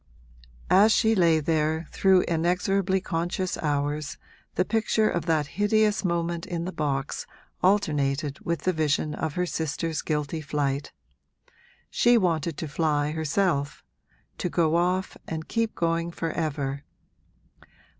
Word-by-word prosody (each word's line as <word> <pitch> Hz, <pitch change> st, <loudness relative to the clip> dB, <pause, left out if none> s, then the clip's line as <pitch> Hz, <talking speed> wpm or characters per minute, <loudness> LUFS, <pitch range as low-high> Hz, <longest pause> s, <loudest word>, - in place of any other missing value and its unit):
As 205 Hz, +4 st, +6 dB
she 220 Hz, 0 st, +4 dB
lay 170 Hz, -6 st, +4 dB
there 160 Hz, +1 st, 0 dB
through 190 Hz, -1 st, +4 dB
inexorably 185 Hz, +3 st, +1 dB
conscious 175 Hz, +1 st, -2 dB
hours 145 Hz, 0 st, -1 dB, 0.4 s
the 185 Hz, -, +2 dB
picture 220 Hz, 0 st, +1 dB
of 170 Hz, -3 st, -2 dB
that 155 Hz, -2 st, +2 dB, 0.2 s
hideous 215 Hz, 0 st, +3 dB
moment 170 Hz, -1 st, -1 dB
in 170 Hz, -2 st, -3 dB
the 185 Hz, -, -3 dB
box 140 Hz, -4 st, -2 dB, 0.3 s
alternated 145 Hz, -7 st, +1 dB
with 170 Hz, -3 st, -2 dB
the 185 Hz, -, +1 dB
vision 155 Hz, -1 st, 0 dB
of 155 Hz, -1 st, -3 dB
her 180 Hz, -, +1 dB
sister's 160 Hz, -1 st, -2 dB
guilty 150 Hz, +1 st, -2 dB
flight. 145 Hz, -1 st, -2 dB, 1.0 s
She 240 Hz, 0 st, +4 dB
wanted 165 Hz, -5 st, 0 dB
to 160 Hz, -, -4 dB
fly, 150 Hz, -1 st, 0 dB
herself 155 Hz, -1 st, -1 dB, 0.6 s
to 180 Hz, -, -1 dB
go 165 Hz, -2 st, +2 dB
off 180 Hz, +2 st, 0 dB
and 160 Hz, -1 st, -5 dB
keep 230 Hz, -1 st, -1 dB
going 170 Hz, 0 st, 0 dB
for 165 Hz, -1 st, -3 dB
ever. 140 Hz, -4 st, -2 dB
165 Hz, 130 wpm, -26 LUFS, 150-185 Hz, 1.0 s, As